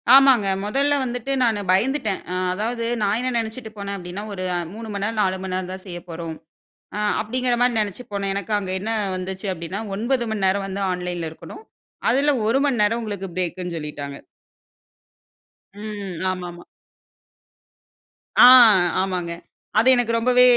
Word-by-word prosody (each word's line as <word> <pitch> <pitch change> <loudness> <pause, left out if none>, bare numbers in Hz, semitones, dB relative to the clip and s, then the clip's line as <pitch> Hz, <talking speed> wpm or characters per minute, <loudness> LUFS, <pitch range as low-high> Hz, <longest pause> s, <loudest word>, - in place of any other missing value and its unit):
ஆமாங்க. 265 -6 +6 0.2
மொதல்ல 275 +7 +1
வந்துட்டு 245 +1 -3
நானு 220 -4 +1
பயந்துட்டன். 220 +1 +1
அ - - -2 0.2
அதாவது 230 +4 -2 0.2
நான் 205 +1 +2
என்ன 255 +1 -1
நெனச்சுட்டு 225 0 -4
போனன் 200 0 -4
அப்டின்னா 180 +2 -7
ஒரு 185 -2 -5 0.3
3 225 +1 -8
மணி 200 0 -3
நேரம், 220 0 -2
4 190 -2 +1
மணி 190 -1 -4
நேரம்தான் 185 0 -5
செய்யப்போறோம். 170 -2 -7 0.6
அ - - -2 0.2
அப்டிங்கிற 245 +3 0
மாரி 245 -2 +3
நெனச்சு 210 +3 -2
போனன். 200 -1 -1
எனக்கு 200 +2 -3
அங்க 190 -2 -5
என்ன 215 +4 -3 0.2
வந்துச்சு 185 +2 -5
அப்டின்னா 180 +4 -5
9 240 +3 0
மணி 205 -3 0
நேரம் 195 +1 +1
வந்து 195 +1 -4
ஆன்லைன்ல 180 -2 -3
இருக்கணும். 285 - -11 0.5
அதுல 280 +3 +3 0.2
1 230 +4 +3
மணி 255 -6 +1
நேரம் 225 +3 +2
உங்களுக்கு 205 -3 -4
பிரேக்குன்னு 180 -1 -2
சொல்லிட்டாங்க. 145 -2 -6 1.6
ம். 205 -3 -6 0.2
ஆமாமா. 175 -2 -7 1.7
ஆ, - - +9 0.6
ஆமாங்க. 180 -3 -2 0.5
அது 230 - +3
எனக்கு 235 -2 +1
ரொம்பவே 250 +2 +4
205 Hz, 145 wpm, -22 LUFS, 185-230 Hz, 1.7 s, ஆ